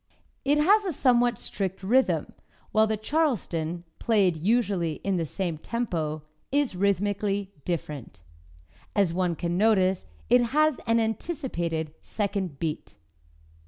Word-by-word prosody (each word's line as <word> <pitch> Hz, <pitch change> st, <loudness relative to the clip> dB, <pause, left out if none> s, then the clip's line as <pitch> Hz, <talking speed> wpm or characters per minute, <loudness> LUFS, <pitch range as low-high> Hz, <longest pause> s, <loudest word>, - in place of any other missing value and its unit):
It 285 Hz, +2 st, +3 dB
has 400 Hz, +8 st, +5 dB
a 370 Hz, -4 st, -2 dB
somewhat 245 Hz, -4 st, +3 dB
strict 190 Hz, -1 st, -4 dB
rhythm, 255 Hz, +7 st, +2 dB, 0.4 s
while 220 Hz, 0 st, +4 dB
the 215 Hz, 0 st, 0 dB
"Charleston," 205 Hz, -, -1 dB, 0.2 s
played 200 Hz, -7 st, +3 dB
usually 190 Hz, -2 st, +1 dB
in 195 Hz, -2 st, 0 dB
the 165 Hz, -2 st, -1 dB
same 170 Hz, -1 st, -3 dB
tempo, 160 Hz, -10 st, -2 dB, 0.3 s
is 285 Hz, -7 st, +1 dB
rhythmically 200 Hz, +1 st, 0 dB
different. 150 Hz, -, -4 dB, 0.8 s
As 195 Hz, -5 st, +3 dB
one 180 Hz, -1 st, 0 dB
can 175 Hz, +2 st, -2 dB
notice, 190 Hz, -, +3 dB, 0.2 s
it 245 Hz, 0 st, +5 dB, 0.2 s
has 310 Hz, -2 st, +4 dB
an 230 Hz, 0 st, +4 dB
anticipated 220 Hz, -, -2 dB
second 200 Hz, -7 st, -2 dB
beat. 155 Hz, 0 st, -4 dB
200 Hz, 125 wpm, -27 LUFS, 170-240 Hz, 0.8 s, has